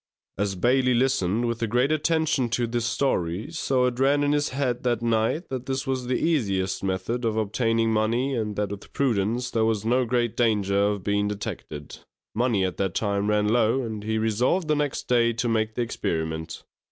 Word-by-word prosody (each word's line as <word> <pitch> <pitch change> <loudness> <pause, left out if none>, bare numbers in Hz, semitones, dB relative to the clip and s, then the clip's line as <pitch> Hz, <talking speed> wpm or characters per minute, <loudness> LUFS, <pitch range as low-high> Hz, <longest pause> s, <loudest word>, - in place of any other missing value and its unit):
As 100 -1 -1
Bailey 125 +5 +2
listened 120 -4 +1
with 115 -1 -2
great 125 +6 +2
attention 155 -4 +1
to 120 - +1
this 120 0 -2
story, 110 - -1
so 135 -5 +1
it 125 0 -1
ran 140 +2 +3
in 145 - +2
his 145 0 +1
head 130 -2 -1
that 120 -2 0
night 115 +8 0
that 130 -1 -5
this 130 0 -2
was 130 -2 -2
the 125 - +1
easiest 100 - 0
method 95 +6 -2
of 110 -1 0
obtaining 115 +1 +1
money, 115 +5 +1
and 110 -4 -2
that 105 0 -1
with 100 - -9
prudence 120 -1 0
there 115 - +1
was 110 -2 0
no 125 +2 +2
great 120 -1 0
danger 100 -4 +2
of 105 -2 -2
being 100 +1 +1
detected. 90 -7 -6 0.3
Money 115 -5 +1
at 90 - -4
that 95 -3 -1
time 100 -1 0
ran 105 0 +2
low, 120 +3 +2
and 110 -3 -5
he 110 +1 -1
resolved 120 - +1
the 155 - +2
next 145 -2 -2
day 120 -1 +3
to 120 +1 -2
make 110 -1 0
the 120 - 0
experiment. 80 -7 -3
115 Hz, 190 wpm, -25 LUFS, 105-130 Hz, 0.3 s, ran